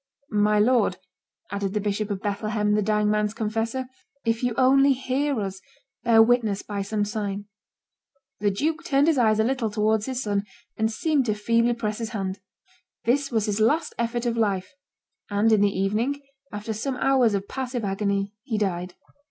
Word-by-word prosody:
"My 210 0 +3
lord," 240 +4 +3 0.5
added 200 0 -2
the - - +2
Bishop 205 +1 -2
of 200 -2 -4
Bethlehem, 210 +1 0
the 210 - +2
dying 210 0 +2
man's 210 0 0
confessor, 225 +4 -2 0.4
"if 230 0 +1
you 245 -3 0
only 270 +1 +5
hear 260 +1 -1
us, 195 -2 -4 0.4
bear 225 -1 +6
witness 225 -4 +1
by 205 -1 -4
some 205 +1 -1
sign." 205 -1 -3 0.9
The 205 0 +2
duke 310 +12 -1
turned 285 -4 +3
his 315 -4 +3
eyes 220 -2 +3
a - - +4
little 245 -1 0
towards 215 +1 +1
his 260 -1 -2
son, 205 -1 0 0.3
and 220 0 0
seemed 280 +2 +1
to 215 - +1
feebly 230 +3 +2
press 215 -2 -3
his 225 -2 -3
hand. 190 0 -3 0.6
This 275 +4 +1
was 220 -4 0
his 210 0 -1
last 295 +10 +2
effort 235 +1 -1
of 235 -1 0
life; 195 -4 0 0.6
and 205 +2 +2
in 215 -2 +4
the 205 - +4
evening, 215 +9 0 0.3
after 210 +2 -4
some 255 +5 -3
hours 255 -6 +3
of 200 0 -3
passive 250 -4 -3
agony, 200 0 -1
he 220 0 -3
died. 180 -3 -2
215 Hz, 175 wpm, -25 LUFS, 205-245 Hz, 0.9 s, bear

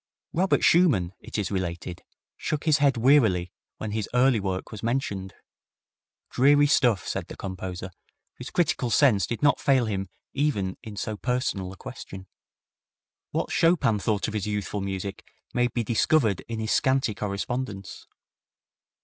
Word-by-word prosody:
Robert 185 +3 +2
Schumann, 140 - +4
it - - -7
is 105 -2 -2
related, 90 -2 -4 0.3
shook 155 -1 -3
his 155 -2 +3
head 140 -3 +3
wearily 110 -9 +4 0.3
when 110 - -5
his 110 -1 -2
early 125 -2 +4
work 95 -2 -3
was 105 - -7
mentioned. 110 -6 -2 1.0
"Dreary 145 +3 +5
stuff," 125 - +3
said - - -3
the - - -8
composer, 95 -1 -6 0.5
whose 125 - -6
critical 145 -7 0
sense 110 - +4
did 120 - -4
not 145 - +4
fail 135 -3 +3
him 95 -3 -3 0.2
even 120 -11 0
in 110 -2 -9
so 105 +1 -4
personal 125 -7 -1
a 95 - -11
question. 95 0 -9 1.0
What - - -2
Chopin 165 -11 +3
thought 105 0 0
of 110 - -5
his 105 -2 -2
youthful 105 -1 -2
music 95 0 -4 0.3
may 125 0 +2
be 120 0 -2
discovered 115 - +2
in 115 -1 -4
his 110 0 -2
scanty 130 -4 +2
correspondence. 100 0 -4
110 Hz, 150 wpm, -26 LUFS, 95-130 Hz, 1.0 s, Dreary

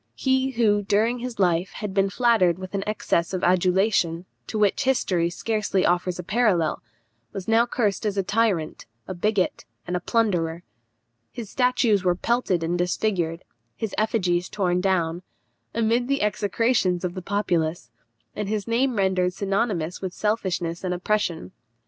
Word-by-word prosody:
He 265 0 +1
who, 220 -5 +2
during 220 +4 +1
his 245 0 -5
life, 180 -1 +1
had 210 -3 -5
been 195 0 +2
flattered 200 -6 +3
with 185 +1 -8
an 195 -1 -1
excess 190 -4 0
of 180 - -4
adulation, 180 -1 +2 0.2
to 220 - -4
which 210 +6 +2
history 185 -10 +1
scarcely 210 0 -1
offers 175 0 +1
a 180 - -5
parallel, 190 -5 +1 0.5
was 190 - -6
now 225 +2 +4
cursed 215 -4 0
as 205 -1 -2
a 195 - +2
tyrant, 195 - 0 0.2
a 185 - -4
bigot, 195 +1 0 0.2
and 180 - -3
a - - 0
plunderer. 175 -6 0 0.7
His 225 -4 -8
statues 245 -6 +2
were 180 -1 +2
pelted 195 -4 0
and 175 +2 -1
disfigured; 175 -2 -1 0.3
his 220 -3 -4
effigies 180 -5 0
torn 180 -3 0
down, 175 -3 0 0.5
amid 230 +2 +1
the 275 -4 0
execrations 210 -2 +1
of 175 - -3
the 185 - -6
populace, 170 - -1 0.4
and 205 -1 -3
his 215 0 -2
name 245 +2 +1
rendered 190 -2 +1
synonymous 195 -4 -1
with 185 -2 -4
selfishness 185 -6 -1
and 180 -1 -1
oppression. 180 - -1
195 Hz, 155 wpm, -24 LUFS, 175-220 Hz, 0.7 s, now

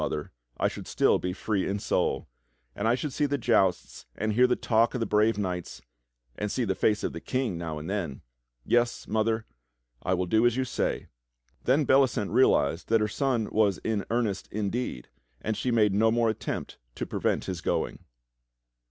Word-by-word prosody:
Mother, - - -3 0.3
I - - +2
should - - -7
still - - +3
be 90 - -2
free 100 +1 -1
in 100 - -1
soul; - - 0 0.5
and 100 - -1
I 115 - +4
should 140 +1 -4
see 145 +1 +1
the 145 0 0
jousts 105 -7 +1
and 110 0 -1
hear 125 +3 +5
the 125 - +2
talk 115 +2 +2
of - - -1
the 115 - 0
brave 105 +1 +2
knights, 90 -9 -3 0.6
and 105 +7 -3
see 125 - 0
the 95 - +1
face 105 +2 +1
of - - -2
the 85 - -6
King 130 -7 -1
now 80 -2 -4
and 75 +1 -6
then. 90 -9 -3 0.4
Yes, 120 0 +1
Mother, 110 +1 0 0.6
I 95 - +1
will 90 0 -1
do 110 +5 +2
as 120 +1 0
you 130 - +1
say." - - -2 0.6
Then 140 +4 +3
Bellicent 130 -6 +3
realized 90 - +3
that 115 0 +4
her 105 - +2
son 120 0 0
was 105 -3 +3
in 110 -3 0
earnest 115 -4 -1
indeed, 105 - -3 0.3
and 110 - -2
she 125 - -2
made 110 -4 +3
no 110 +3 +4
more 115 0 +2
attempt 110 - -5 0.2
to - - -3
prevent - - -1
his 90 -3 -4
going. - - -1
110 Hz, 190 wpm, -28 LUFS, 95-120 Hz, 0.6 s, hear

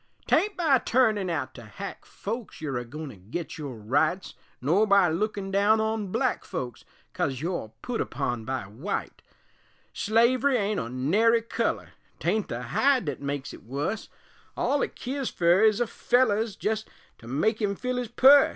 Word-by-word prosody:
'Tain't 415 +1 +2
by 305 -7 +4
turnin' 220 -8 +2
out 155 -6 -2
to 120 - -10
hack 190 - -8
folks 225 +1 -6
You're 135 -5 -2
agoin' 145 +6 -7
to 105 - -11
git 125 - -6
your 140 -5 -5
rights 145 - 0 0.3
Nor 175 +11 +3
by 200 -3 +5
lookin' 195 +3 -2
down 205 +3 +4
on 220 -1 -1
black 235 +5 0
folks 120 -3 -5 0.3
Coz 130 -2 -1
you're 165 -8 -3
put 245 -2 -2
upon 120 -3 -2
by 130 -2 -3
wite; 130 - -5 0.7
Slavery 250 +5 +3
ain't 205 -1 0
o' - - -3
nary 205 - +2
color, 230 - -1 0.3
'Tain't 205 +4 0
the - - -4
hide 270 -5 +2
thet 145 -3 -4
makes 140 -1 -3
it - - -11
wus, 145 - -3 0.5
All 285 0 +1
it - - -2
keers 265 0 -3
fer 175 +2 +3
is 215 0 +5
a 240 - +2
feller 240 -2 +2
'S 220 -3 -2
jest 220 +1 -2 0.3
to 115 - -13
make 210 - 0
him 200 -1 +1
fill 250 +4 -2
his 250 -1 -2
pus. 270 +5 +7
200 Hz, 170 wpm, -27 LUFS, 140-230 Hz, 0.7 s, pus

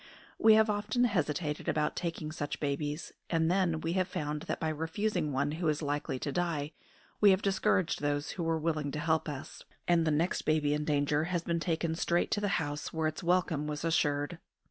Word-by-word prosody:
We 220 0 +7
have 220 0 +5
often 210 +3 0
hesitated 155 - 0
about 150 -1 0
taking 165 -3 -3
such 145 -2 -4
babies; 145 +2 -2 0.2
and 165 0 +2
then 180 -4 +1
we 165 +1 -1
have 185 -1 +1
found 150 0 -3
that - - -1
by 160 - 0
refusing 160 +2 -1
one 140 +2 0
who 165 +2 -2
is 150 0 0
likely 145 -2 -2
to 145 - -3
die 160 -3 -1 0.5
we 205 - +7
have 190 0 +3
discouraged 190 -4 +1
those 145 0 -1
who 180 - -5
were 165 -1 +1
willing 155 -2 -1
to 150 - -2
help 160 0 +1
us, 145 -2 -7 0.2
and 170 -1 +4
the 160 - +1
next 160 +4 +1
baby 155 -2 +2
in 150 0 -1
danger 145 +1 +1
has 175 -1 -1
been 170 0 0
taken 165 -1 -1
straight 170 +1 0
to 205 - +1
the 205 - +1
house 145 -3 -3
where 160 -1 -1
its 155 - -4
welcome 170 -4 +1
was 150 +1 -3
assured. 150 0 +1
160 Hz, 205 wpm, -31 LUFS, 150-175 Hz, 0.5 s, We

